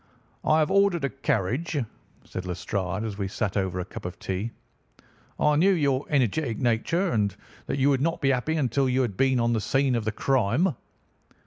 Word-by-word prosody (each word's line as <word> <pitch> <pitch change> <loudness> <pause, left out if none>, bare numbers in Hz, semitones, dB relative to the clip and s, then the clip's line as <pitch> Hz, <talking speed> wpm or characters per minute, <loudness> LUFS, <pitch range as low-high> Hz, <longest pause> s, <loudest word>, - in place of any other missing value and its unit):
"I 155 - +4
have 155 -1 +2
ordered 195 -5 +3
a 140 - 0
carriage," 135 - -1 0.5
said 95 0 -6
Lestrade 90 +2 -3
as 105 -2 -5
we 100 - -1
sat 100 0 -2
over 95 -2 -1
a 90 - -3
cup - - -9
of 90 0 -6
tea. 95 +4 -3 0.9
"I 150 0 +3
knew 190 +6 +5
your 140 -5 +1
energetic 130 -3 +1
nature, 165 - +1
and 105 -3 0 0.3
that - - -1
you 140 +1 +3
would 135 -1 +1
not 165 +3 0
be 135 - +2
happy 135 +5 0
until 135 -2 +1
you 130 +1 +2
had 110 -6 -3
been 130 +2 +2
on 120 0 +2
the 110 - 0
scene 135 +5 +1
of 115 -3 -1
the 110 - 0
crime." 135 - +2
130 Hz, 195 wpm, -26 LUFS, 105-145 Hz, 0.9 s, knew